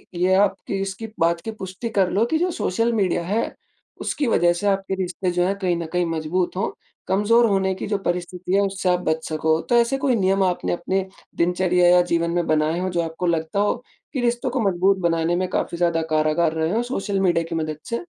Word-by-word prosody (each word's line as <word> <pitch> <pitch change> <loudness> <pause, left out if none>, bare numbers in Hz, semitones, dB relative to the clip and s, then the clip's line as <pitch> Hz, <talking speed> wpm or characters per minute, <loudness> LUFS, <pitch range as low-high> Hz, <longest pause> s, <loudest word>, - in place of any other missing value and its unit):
ये 180 +2 +2
आपकी 195 0 +1
इसकी 195 +3 -4
बात 170 0 +2
की 225 - -5
पुष्टि 190 +5 -5
कर 195 -4 +2
लो 210 +4 +2
कि 315 +7 0
जो 355 +2 0
सोशल 230 +6 +1
मीडिया 190 -5 +1
हैI 210 +6 0 0.5
उसकी 290 - -1
वज़ह 175 -6 +3
से 175 +4 -2
आपके 195 -1 0
रिश्ते 185 0 -2
जो 175 0 +1
हैं 195 - 0
कहीं 180 -3 +1
न 170 - -4
कहीं 180 0 +1
मजबूत 165 +3 -1
हो 195 - -1 0.3
कमज़ोर 210 +5 +4
होने 190 -1 +1
की - - -5
जो 205 - 0
परिस्थिति 180 +1 -2
है 200 - +4
उससे 195 -2 -1
आप 180 0 +3
बच 160 0 0
सकोI 160 +1 +1
तो 240 - +4
ऐसे 235 +3 +3
कोई 265 -2 +1
नियम 195 -2 +2
आपने 180 -2 0
अपने 190 +2 -1 0.3
दिनचर्या 180 +1 +2
या 180 0 +6
जीवन 170 0 +1
में 175 0 0
बनाएँ 155 +2 +1
हो 185 - -1
जो 175 -1 0
आपको 165 +2 -4
लगता 165 +2 0
हो 205 0 +2 0.4
कि 260 - -1
रिश्तों 240 +1 0
को 255 +1 -2
मजबूत 190 +2 +2
बनाने 165 +1 +1
में 185 +1 0
काफ़ी 170 - -2
ज़्यादा 170 -1 +1
कारागार 155 +1 +2
रहे 160 +1 -1
हों 230 - +1
सोशल 205 -5 -2
मीडिया 175 -3 +2
की - - -3
मदद 155 -2 -2
से? 235 +8 -3
185 Hz, 220 wpm, -22 LUFS, 170-200 Hz, 0.5 s, या